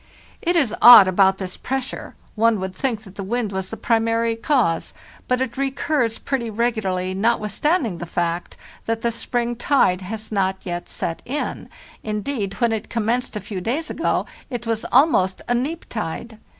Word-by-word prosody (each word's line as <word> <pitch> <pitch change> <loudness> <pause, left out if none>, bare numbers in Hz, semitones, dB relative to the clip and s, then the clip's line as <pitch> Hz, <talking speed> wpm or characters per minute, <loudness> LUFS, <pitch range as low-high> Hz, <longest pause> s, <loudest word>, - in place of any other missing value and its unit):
It 350 +1 +1
is 275 -10 +2
odd 235 -5 +11
about 190 +1 +4
this 185 -2 -5
pressure: 265 -1 -4 0.2
one 225 -1 +2
would 190 0 -4
think 225 0 -2
that 195 -3 -13
the 200 - -6
wind 225 +1 -2
was 190 -1 -4
the 225 - -6
primary 230 0 +1
cause; 225 - 0 0.3
but 250 0 +1
it 260 -2 -3
recurs 270 -3 0
pretty 250 -4 -2
regu 235 +1 0
larly, 185 -1 -2
notwithstanding 225 - 0
the 175 - -6
fact 170 0 -2 0.3
that 225 0 -1
the 235 - +2
spring 240 +1 -2
tide 235 -7 +2
has 215 +4 -6
not 190 -2 +1
yet 175 -1 -5
set 165 - -3
in; 285 +4 -4 0.3
indeed, 210 -1 -3
when 235 -2 +1
it 220 -1 -3
commenced 235 +2 -1
a - - -2
few 200 -1 -6
days 265 - -2
ago - - 0 0.2
it 245 -2 -5
was 225 -1 -2
almost 240 - +3
a 245 - +2
neap 280 +8 -2
tide. 220 +2 -5
225 Hz, 175 wpm, -22 LUFS, 190-245 Hz, 0.3 s, odd